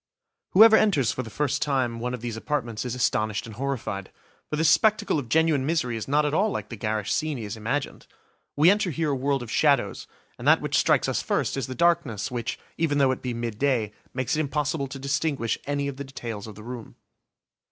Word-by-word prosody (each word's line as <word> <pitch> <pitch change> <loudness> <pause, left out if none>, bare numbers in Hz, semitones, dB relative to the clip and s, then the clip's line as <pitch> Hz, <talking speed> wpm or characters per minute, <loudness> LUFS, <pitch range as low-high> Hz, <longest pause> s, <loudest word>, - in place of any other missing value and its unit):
Whoever 220 +3 +9
enters, 180 - +3
for - - -3
the 115 - -8
first 145 +5 -1
time, 130 -5 0
one 125 +2 -2
of 120 - -11
these 120 -2 -4
apartments 115 -3 -3
is 125 -1 -3
astonished 110 -4 0
and 115 - -9
horrified. 115 -8 -3 0.4
For - - -1
this 160 +1 +2
spectacle 215 -2 +3
of 125 -5 -7
genuine 160 -2 +3
misery 135 -5 0
is 110 - -5
not 150 +2 +2
at 150 - -1
all 200 +7 +3
like - - -4
the 115 - -6
garish 105 -1 -2
scene 155 -3 -1
he 115 - -6
has 105 0 -5
imagined. 125 +6 -3 0.5
We 155 +5 +6
enter 205 -2 +1
here 160 -1 -1
a - - +1
world 135 0 0
of 115 - -8
shadows, 145 -3 +2 0.3
and - - -4
that - - +6
which - - -2
strikes - - +3
us - - 0
first - - -1
is 135 -4 -3
the 130 - -6
darkness 170 -12 +1
which, 120 -2 -3 0.2
even 155 -3 +1
though 135 -2 +4
it 130 - -3
be 125 -2 -3
midday, 115 -1 -1 0.2
makes 130 +3 -1
it - - -1
impossible 145 0 -1
to 135 - -7
distinguish 140 -3 -1
any 140 0 -1
of 140 -1 -5
the 140 - -4
details 115 -6 -7
of 105 - -9
the 105 - -11
room. 120 -1 -8
135 Hz, 220 wpm, -25 LUFS, 115-150 Hz, 0.5 s, Whoever